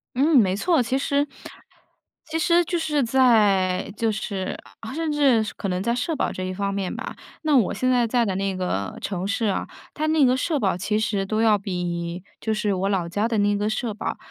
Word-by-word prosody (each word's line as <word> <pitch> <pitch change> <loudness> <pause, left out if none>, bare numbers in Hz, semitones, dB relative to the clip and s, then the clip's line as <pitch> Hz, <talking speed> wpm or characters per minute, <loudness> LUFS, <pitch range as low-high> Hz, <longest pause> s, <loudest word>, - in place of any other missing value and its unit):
嗯， 285 +3 +4
没 190 -5 +4
错。 320 - +2
其 250 +3 0
实 280 +1 +1 1.0
其 320 +1 -3
实 350 +1 +4
就 345 +1 -1
是 300 -4 0
在， 210 -8 +3
就 225 +1 0
是 200 -3 -4 0.2
啊， 225 +3 -7
甚 320 0 -2
至 275 -7 +3
可 - - -4
能 180 0 -1
在 235 +4 0
社 315 +6 -1
保 - - -1
这 185 - -5
一 185 - -3
方 200 +1 -2
面 195 -2 -2
吧， - - -6 0.3
那 305 -2 +3
我 235 -7 +3
现 255 - 0
在 245 -2 +3
在 240 +1 +2
的 195 -3 -1
那 195 0 -1
个 100 - -3
城 190 -1 -3
市 220 +3 -1
啊， 200 - -1 0.3
它 310 +1 -2
那 310 -2 +4
个 250 0 +4
社 295 +3 0
保 195 -7 +1
其 210 +3 0
实 210 -3 0
都 215 +3 -1
要 220 -2 +5
比， 175 -2 -4 0.2
就 220 - 0
是 210 -1 0
我 190 +1 -1
老 185 -4 0
家 205 +6 0
的 230 -2 -1
那 205 0 +2
个 205 +1 0
社 220 0 -2
保 215 - -4
215 Hz, 235 characters per minute, -24 LUFS, 195-265 Hz, 1.0 s, 要